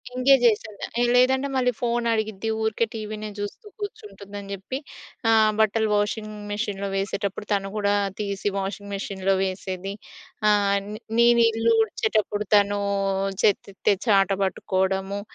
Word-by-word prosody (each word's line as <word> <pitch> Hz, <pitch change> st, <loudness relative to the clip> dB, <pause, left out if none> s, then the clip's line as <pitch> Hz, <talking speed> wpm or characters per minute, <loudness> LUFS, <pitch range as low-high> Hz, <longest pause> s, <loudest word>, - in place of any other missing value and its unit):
Engage 265 Hz, 0 st, +5 dB
చేసే 215 Hz, -2 st, +2 dB, 0.2 s
దాన్ని. -, -, -3 dB, 0.2 s
ఆ -, -, +4 dB
లేదంటే 260 Hz, +2 st, +4 dB
మళ్ళీ 250 Hz, -1 st, +2 dB
ఫోన్ 240 Hz, 0 st, 0 dB
అడిగిద్ది, 220 Hz, -1 st, -2 dB
ఊరికే 220 Hz, +1 st, +1 dB
టీవీనే 215 Hz, 0 st, -5 dB
చూస్తూ 205 Hz, -, -6 dB
కూర్చుంటుంది 205 Hz, -, -8 dB
అని 200 Hz, 0 st, -9 dB
చెప్పి 200 Hz, +7 st, -5 dB, 0.5 s
ఆహ్, 220 Hz, -1 st, +5 dB
బట్టలు 220 Hz, 0 st, +2 dB
వాషింగ్ 215 Hz, +1 st, -1 dB, 0.2 s
మిషన్‌లో 205 Hz, -1 st, -2 dB
వేసేటప్పుడు 200 Hz, +1 st, -2 dB
తను 195 Hz, -1 st, -1 dB
గూడా 205 Hz, -1 st, +1 dB, 0.3 s
తీసి 200 Hz, -1 st, -2 dB
వాషింగ్ 200 Hz, +1 st, -5 dB
మిషన్‌లో 195 Hz, -1 st, -1 dB
వేసేది, 190 Hz, 0 st, -4 dB, 0.6 s
ఆహ్, 200 Hz, -1 st, +3 dB, 0.4 s
నేను 235 Hz, 0 st, +6 dB
ఇల్లు 225 Hz, +1 st, +2 dB
ఉడిచేటప్పుడు 210 Hz, -1 st, -1 dB
తనూ 205 Hz, 0 st, +3 dB, 0.6 s
చెత్త 205 Hz, -, +3 dB
ఎత్తే 200 Hz, -, +2 dB
చాటా 195 Hz, -2 st, +4 dB
పట్టుకోవడము. 190 Hz, +1 st, -1 dB
205 Hz, 135 wpm, -24 LUFS, 200-220 Hz, 0.6 s, నేను